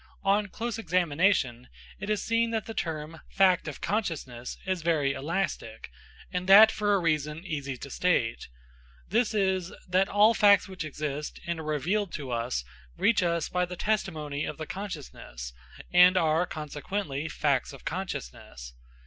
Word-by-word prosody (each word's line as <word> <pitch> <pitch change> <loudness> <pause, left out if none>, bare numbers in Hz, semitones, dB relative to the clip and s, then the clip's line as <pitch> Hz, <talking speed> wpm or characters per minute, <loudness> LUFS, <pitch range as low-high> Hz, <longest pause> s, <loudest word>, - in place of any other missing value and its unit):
On 200 +1 +2
close 230 +3 -4
examination, 165 - +1 0.3
it 205 - -5
is 210 -2 0
seen 230 0 +1
that 225 -1 -2
the 225 - -6
term, 160 -3 -4
fact 185 -3 +3
of 150 - -6
consciousness, 155 - -3
is 185 -2 -1
very 155 -4 +1
elastic, 170 +8 -3 0.4
and 180 0 -3
that 215 +3 +10
for 205 -1 +1
a - - +2
reason 155 0 -1
easy 140 -6 -4
to 140 - -8
state. 145 -11 0 0.6
This 220 +2 +1
is, 190 -3 +1 0.2
that 185 +2 +2
all 210 +3 +5
facts 205 -2 +5
which 185 -3 -6
exist 150 -1 -4
and 170 -1 -2
are - - -5
revealed 175 +7 0
to 135 -4 -5
us 115 - -1 0.3
reach 230 - +3
us 170 -2 0
by 180 0 0
the 180 0 -4
testimony 155 -9 -1
of - - -4
the 155 - -5
consciousness, 145 - -7 0.4
and 180 +1 +7
are, 165 +1 +2
consequently, 150 0 -4
facts 140 -4 0
of 135 - -13
consciousness. 60 - -6
170 Hz, 155 wpm, -28 LUFS, 150-195 Hz, 0.6 s, that